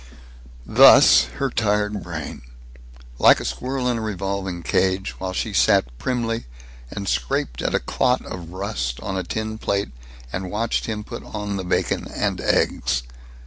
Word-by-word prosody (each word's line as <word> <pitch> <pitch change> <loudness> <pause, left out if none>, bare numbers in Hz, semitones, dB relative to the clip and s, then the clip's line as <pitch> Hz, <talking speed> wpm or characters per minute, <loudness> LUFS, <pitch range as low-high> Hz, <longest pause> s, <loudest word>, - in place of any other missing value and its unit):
Thus - - +8
her 135 -2 -1
tired 105 -2 0
brain, 85 -6 -6 0.8
like - - +7
a - - -6
squirrel 130 0 -2
in 120 -2 0
a - - -4
revolving 95 -4 -3
cage, 95 +2 +1
while 95 0 -3
she 95 - -3
sat - - +3
primly 115 - -2 0.4
and 100 +5 -6
scraped 60 -1 -1
at - - 0
a - - +3
clot 125 - 0
of 85 -3 -7
rust 65 -10 -3
on 95 -3 -4
a 95 - -1
tin 110 +4 -4
plate 100 -9 -1 0.4
and 95 0 -3
watched 110 +4 -1
him 105 -1 -3
put 115 +2 -8
on 105 -1 -5
the 95 - -3
bacon 90 - -1
and - - -2
eggs. 60 - +1
100 Hz, 155 wpm, -22 LUFS, 90-110 Hz, 0.8 s, Thus